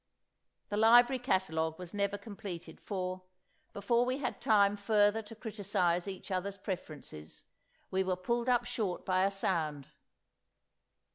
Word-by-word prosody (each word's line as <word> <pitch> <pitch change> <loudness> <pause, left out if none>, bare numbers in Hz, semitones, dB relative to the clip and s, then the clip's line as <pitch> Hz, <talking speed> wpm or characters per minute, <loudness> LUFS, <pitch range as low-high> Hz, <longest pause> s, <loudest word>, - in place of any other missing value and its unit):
The 205 - -2
library 240 +4 +6
catalogue 160 - 0
was 180 -2 -9
never 200 0 0
completed, 195 -5 -8
for, 185 -2 -3 0.5
before 235 +4 +2
we 255 +1 0
had 255 -4 -3
time 205 -2 +4
further 205 +1 +3
to 220 +1 -11
criticize 195 -5 0
each 195 0 -7
other's 195 +2 -2
preferences, 155 - -7 0.5
we 190 0 +2
were 185 -1 0
pulled 235 +7 -1
up 245 -1 +3
short 220 -7 -3
by 185 0 +3
a - - +3
sound. 160 -8 -2
200 Hz, 135 wpm, -32 LUFS, 185-220 Hz, 0.5 s, library